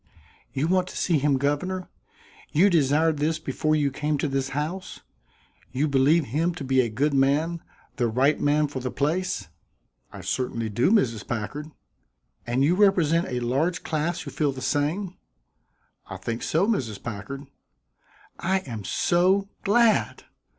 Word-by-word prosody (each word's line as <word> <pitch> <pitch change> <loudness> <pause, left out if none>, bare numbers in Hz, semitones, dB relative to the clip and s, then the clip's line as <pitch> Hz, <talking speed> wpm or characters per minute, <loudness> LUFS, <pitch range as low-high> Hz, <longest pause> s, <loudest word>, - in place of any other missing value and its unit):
"You 140 +4 -1
want 185 +1 +2
to - - -8
see 165 -5 +2
him 140 -1 +2
governor? 175 +7 -1 0.6
You 190 +7 +4
desired 155 0 +3
this 155 +2 0
before 155 0 -1
you 145 -2 +1
came 150 +2 -1
to 145 - -1
this 135 -1 -1
house? 155 +7 -4 0.7
You 135 +4 0
believe 145 +3 +3
him 165 +8 -1
to 160 - -6
be 130 -1 +3
a 120 - -1
good 140 +7 0
man 145 +5 +2 0.4
the 120 - +2
right 130 +6 +2
man 150 +1 +2
for 140 -2 -5
the 130 0 -3
place?" 160 - -1 0.6
"I - - -9
certainly 115 -3 -2
do, 120 - +2
Mrs. 120 - +1
Packard." 135 +7 -4 0.8
"And 125 +3 +1
you 155 +5 +4
represent 180 -4 +3
a 125 -1 -3
large 140 +9 0
class 160 +2 -1
who 140 - -7
feel 150 -2 0
the 130 - -8
same?" 155 +8 -1 0.9
"I - - -7
think 115 0 -4
so, 165 +5 +1
Mrs. 115 - -2
Packard." 135 +6 -6 0.9
"I 190 +2 +1
am 115 - -7
so 185 - +2
glad!" 225 +2 +3
150 Hz, 155 wpm, -25 LUFS, 130-170 Hz, 0.9 s, You